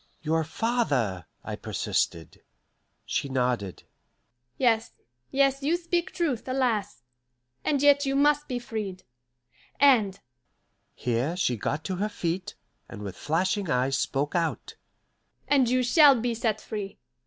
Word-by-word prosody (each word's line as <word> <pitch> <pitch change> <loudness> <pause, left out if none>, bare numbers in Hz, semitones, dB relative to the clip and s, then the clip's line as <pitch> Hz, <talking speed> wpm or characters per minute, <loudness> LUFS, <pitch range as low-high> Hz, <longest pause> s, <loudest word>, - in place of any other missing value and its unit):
"Your 160 +1 +1
father 145 - -1
" - - -43
I - - -5
persisted. 80 -1 -2 0.6
She 140 - -2
nodded. 125 -7 -1 0.7
"Yes, 225 -3 +2 0.4
yes, 275 0 +2
you 310 +5 +1
speak 345 0 -1
truth, 295 -10 -2
alas! 230 - -1 0.6
And 285 -2 +1
yet 285 0 +6
you 270 - 0
must 295 +1 +3
be 250 - -2
freed. 215 -6 -5 0.8
And" 230 -9 +4 0.8
here 125 +8 -1
she 125 -9 +1
got 145 +8 -3
to 185 +2 -3
her 210 +3 -1
feet, 180 -2 -3 0.3
and 105 - -8
with 100 -2 -6
flashing 185 +5 -1
eyes 130 +1 +1
spoke 140 +2 -1
out 165 -2 -2 0.7
"and 270 -4 +3
you 255 0 +2
shall 280 0 +6
be 240 +1 -1
set 220 -2 -1
free. 205 -3 -6
210 Hz, 130 wpm, -27 LUFS, -, 0.8 s, yet